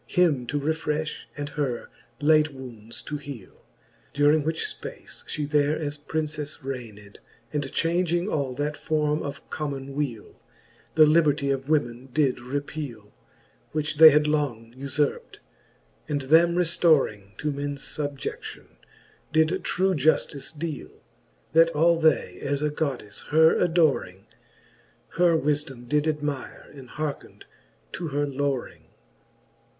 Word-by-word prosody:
Him 150 -9 +2
to 145 - -1
refrefli, 155 +1 -1 0.2
and 145 0 -4
her 140 -6 -3 0.3
late 155 +1 +4
wounds 115 -4 -9
to 150 - -4
heale: 140 -8 -10 0.5
During 145 +1 +4
which 160 +1 -1
fpace - - -7
(he 150 - -2
there 145 +1 +2
as 145 -1 -4
Princefs 150 -1 -3
rained, 110 -6 -7 0.3
And 145 -2 -2
changing 175 +1 +1
all 140 -9 -1
that 150 +2 -2
forme 150 -1 0
of 140 - -7
common 140 -3 -4
weale, 135 -7 -4 0.5
The 155 -1 +8
liberty 150 -3 +3
of 135 +1 -3
women 130 -4 0
did 140 -2 +2
repeale, 130 -4 -5 0.6
Which 155 0 -2
they 160 0 +11
had 150 0 +4
long 135 -7 -1
ufurpt; 140 +2 -2 0.7
and 145 -1 0
them 165 +5 +5
reftoring 155 - +2
To 150 - -1
mens 140 0 -4
fubje(9:ion, 145 - -6 0.5
did 160 +4 +2
true 190 +1 +1
juftice 145 -2 +1
deale: 155 -3 -6 0.5
That 165 +1 +6
all 165 +2 +4
they 160 -1 +2
as 140 +1 -1
a 150 - +1
Goddelfe 130 -9 -4
her 160 +1 +5
adoring, 155 - +1 0.8
Her 170 -1 +3
wifedome 145 -4 -2
did 150 +4 +1
admire, 150 -3 -3
and 135 -3 -12
hearkned 155 -2 -5 0.5
to 170 - -4
her 145 0 0
loring. 140 -2 -3
145 Hz, 125 wpm, -26 LUFS, 135-155 Hz, 0.8 s, they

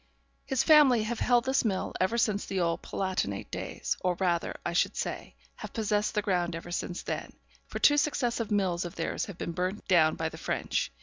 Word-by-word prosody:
'His 265 -3 +1
family 285 -8 +6
have 225 +1 -3
held 245 -1 +3
this 265 +1 +2
mill 200 -5 -1
ever 190 +6 +1
since 210 -3 +1
the 190 - -2
old 170 -1 0
Palatinate 185 - -3
days; - - -3
or 180 -1 0
rather, 175 -2 0
I 170 - -1
should 175 - +1
say, - - -4 0.2
have - - -8
possessed 210 -1 0
the 210 - +1
ground 175 -3 0
ever 165 +1 -7
since 175 0 -3
then, - - -4 0.3
for - - -5
two 290 - +5
successive 245 -6 0
mills 190 -4 +1
of 175 - -7
theirs 165 +9 -2
have 200 -6 -9
been - - -4
burnt 185 +4 -3
down 160 -4 +4
by - - -2
the - - -11
French. - - -1
195 Hz, 200 wpm, -29 LUFS, 175-235 Hz, 0.3 s, family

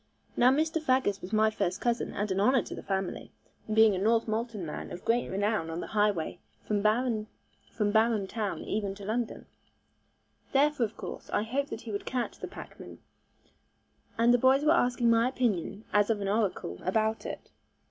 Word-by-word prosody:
Now 245 - +5
Mr. 315 +4 +1
Faggus 255 -8 +1
was 180 - -8
my 220 0 +3
first 180 -4 -1
cousin 240 -1 -1
and 205 0 -2
an 190 - 0
honour 250 +4 +4
to - - -8
the - - -7
family, 190 -2 -3 0.4
being 220 -2 +5
a - - -2
Northmolton 225 -1 0
man 150 - -6
of 175 - -8
great 240 +1 +1
renown 205 -3 0
on 165 +1 -4
the - - -4
highway 205 -6 +1 0.2
from 210 -1 0
Barum 215 -1 0
town 210 -1 -3
even 200 -2 -2
to 200 0 -10
London. 225 +2 -3 1.1
Therefore 280 -2 +3
of 215 - -21
course, - - -7
I 205 - 0
hoped 275 +6 -2
that 225 - -6
he 225 - -7
would 200 - -4
catch 250 -2 -3
the - - -5
packmen, - - -10 1.2
and 235 +1 +5
the 245 - +4
boys 265 +4 +4
were 305 - +5
asking 245 -6 +3
my 230 +2 +4
opinion 220 -5 -1
as 205 +1 +4
of 220 -2 +1
an 200 - -3
oracle, 195 - -1
about 220 +3 0
it. - - -8
220 Hz, 180 wpm, -29 LUFS, 205-240 Hz, 1.2 s, Now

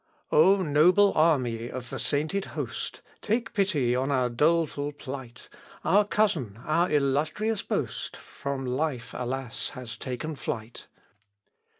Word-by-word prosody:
O 190 +5 +5
noble 180 +7 +5
army 125 -8 +2
of 125 -2 -7
the 135 - -4
sainted 150 - 0
host, - - -4 0.2
Take 225 +2 -1
pity 155 - +2
on 130 +2 0
our 130 -3 +2
doleful 150 +2 +1
plight; 130 -4 -8 0.4
Our 205 +1 +5
cousin, 160 - 0
our 170 +3 +2
illustrious 155 +10 +1
boast, - - -3
From 140 -1 -5
life, 130 -1 -2
alas, 125 0 -3
has 125 -1 -7
taken 130 +5 -4
flight. 115 -3 -5
145 Hz, 120 wpm, -27 LUFS, 125-170 Hz, 0.4 s, O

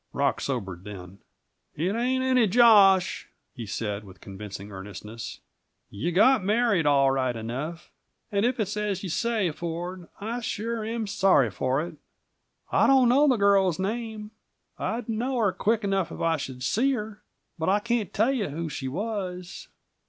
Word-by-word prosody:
Rock - - 0
sobered 95 -10 -4
then. 95 -2 -10 0.6
"It 175 +6 -1
ain't 255 +2 0
any 255 -3 +3
josh," 200 -4 +5 0.3
he 115 -3 -7
said, 105 0 -3
with 95 -2 -14
convincing 100 0 -8
earnestness. 105 +3 -8 0.5
"You 150 +13 -2
got 220 +5 +4
married, 205 -5 +2
all 140 -2 +4
right 130 -2 0
enough. 135 +10 -5 0.4
And 200 0 +1
if 245 +1 +1
it's 210 -1 -1
as 210 -3 -2
you 190 - -4
say, 220 -1 0
Ford, 175 +2 -5
I 225 +4 -3
sure 225 0 -3
am 225 +1 -3
sorry 190 - +3
for 130 +8 0
it. 170 -3 -10 0.7
I - - +4
don't 260 -3 +5
know 280 +4 +5
the 255 -4 +3
girl's 195 -4 +3
name. 215 +1 -4 0.5
I'd 235 0 -3
know 240 +4 -1
her 210 -5 +2
quick 220 +4 0
enough 195 -3 0
if - - -8
I 165 -1 +1
should 130 -3 -6
see 260 - +2
her, 215 -3 -5 0.4
but 160 - 0
I 200 - +4
can't 230 -1 -1
tell 225 +6 +2
you 225 - -1
who 160 +3 -4
she 135 -2 -5
was." 185 - -5
195 Hz, 165 wpm, -26 LUFS, 135-225 Hz, 0.7 s, josh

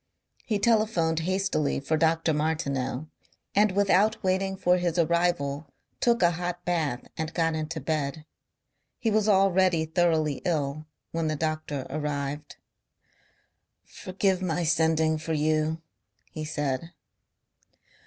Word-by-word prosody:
He 215 - 0
telephoned 205 -7 +2
hastily 185 -4 0
for 140 +3 -1
Dr. 160 0 +2
Martineau 150 -3 -1 0.5
and 205 -1 +3
without 200 +2 +3
waiting 190 +1 0
for 180 -1 +3
his 175 -1 -1
arrival 165 -4 +1 0.3
took 235 -4 +2
a 175 - +5
hot 175 +1 -4
bath 160 -8 -1
and 160 0 -2
got 165 -1 +1
into 160 +1 -3
bed. 150 0 -2 0.7
He 225 - 0
was 215 0 +2
already 190 -4 +3
thoroughly 160 -3 +1
ill 155 -2 -1 0.2
when 165 -1 -1
the 155 - 0
doctor 155 -3 -3
arrived. 145 0 -4 1.3
"Forgive 190 0 -1
my 175 -1 -1
sending 160 -1 +2
for 160 +1 -3
you," 155 +1 0 0.5
he 155 -1 -5
said. 150 +1 -3
160 Hz, 120 wpm, -27 LUFS, 155-180 Hz, 1.3 s, a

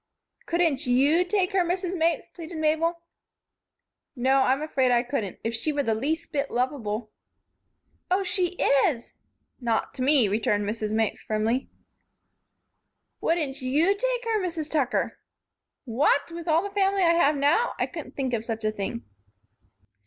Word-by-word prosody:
"Couldn't 335 -7 +1
you 280 +8 +4
take 365 0 0
her, 380 -2 +3
Mrs. 360 +1 -2
Mapes?" 335 0 +1
pleaded 335 -1 -9
Mabel. 325 +2 0 1.1
"No, 260 +2 +2
I'm 265 +2 +2
afraid 265 -4 +1
I 240 0 +3
couldn't. 235 -7 -3
If 225 - -2
she 230 +7 -1
were 290 -1 0
the 225 - +1
least 310 +10 -2
bit 280 -2 -1
lovable 240 -4 -2 0.5
" - - -45
"Oh, 375 +2 +2
she 360 -1 -1 0.3
is 240 -6 -4 0.2
" - - -45
"Not 220 - 0
to - - -7
me," 265 -4 +5
returned 205 0 0
Mrs. 215 0 -3
Mapes, 220 -1 0
firmly. 220 +4 -1 1.5
"Wouldn't 300 -6 -1
you 305 +10 +2
take - - -1
her, 445 -2 +1
Mrs. 330 -4 -4
Tucker?" 275 -6 0 0.7
"What! 275 +6 +1
With 335 0 -7
all 325 +2 +3
the 405 - -5
family 390 -1 +2
I 335 -1 +5
have 305 -3 +3
now? 295 +12 +2
I - - +1
couldn't - - -9
think 260 -3 -2
of 225 -2 -1
such 225 -1 -4
a 215 - +2
thing." 195 - -5
290 Hz, 160 wpm, -26 LUFS, 240-340 Hz, 1.5 s, me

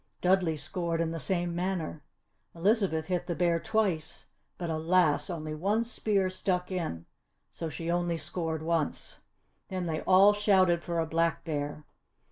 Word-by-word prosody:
Dudley 180 -3 +2
scored 170 +2 -1
in 165 -1 0
the 165 - -4
same 175 +3 -1
manner. 175 -3 -2 0.5
Elizabeth 185 -3 +1
hit 180 0 -2
the 170 - -1
bear 170 -1 +2
twice 195 -7 -1 0.3
but 175 - -4
alas! 160 +1 +2
only 155 -3 -4
one 200 +9 +1
spear 210 -4 0
stuck 185 0 -1
in 160 - -3 0.5
so 165 - -5
she 165 +2 -3
only 175 -1 0
scored 160 0 -3
once. 165 -2 -2 0.5
Then 185 -2 -3
they 160 -2 -2
all 195 +2 +6
shouted 190 -4 +3
for 170 -1 -3
a 165 - +1
Black 165 +1 0
Bear. 145 -1 -3
170 Hz, 150 wpm, -29 LUFS, 160-185 Hz, 0.5 s, all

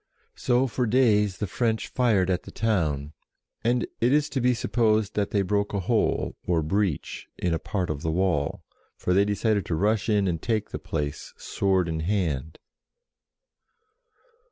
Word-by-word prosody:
So 125 +1 +1
for 125 -1 -1
days 105 -5 +3
the 105 - -2
French 110 +3 -1
fired 105 -7 +2
at 90 - 0
the - - -12
town, 75 -10 -1 0.5
and 120 +1 +2 0.2
it 120 +2 +3
is 150 +1 +2
to 135 - -2
be 125 0 +3
supposed 110 -2 +1
that 105 -1 0
they 100 -2 +1
broke 100 +2 0
a - - +1
hole, 90 - 0
or 85 -3 +2
breach, 95 -1 -1
in 90 -2 0
a 80 - 0
part 90 -3 -2
of 70 -2 -5
the 80 - -2
wall, 85 -4 0 0.3
for 90 - 0
they 100 +2 +4
decided 105 0 +1
to 80 - 0
rush 105 +4 +1
in 105 -2 +2
and 85 -3 -1
take 110 -3 -1
the - - -4
place 75 -3 -4
sword 95 -3 0
in 80 -1 -2
hand. 80 -5 -1
100 Hz, 170 wpm, -26 LUFS, 85-110 Hz, 0.5 s, they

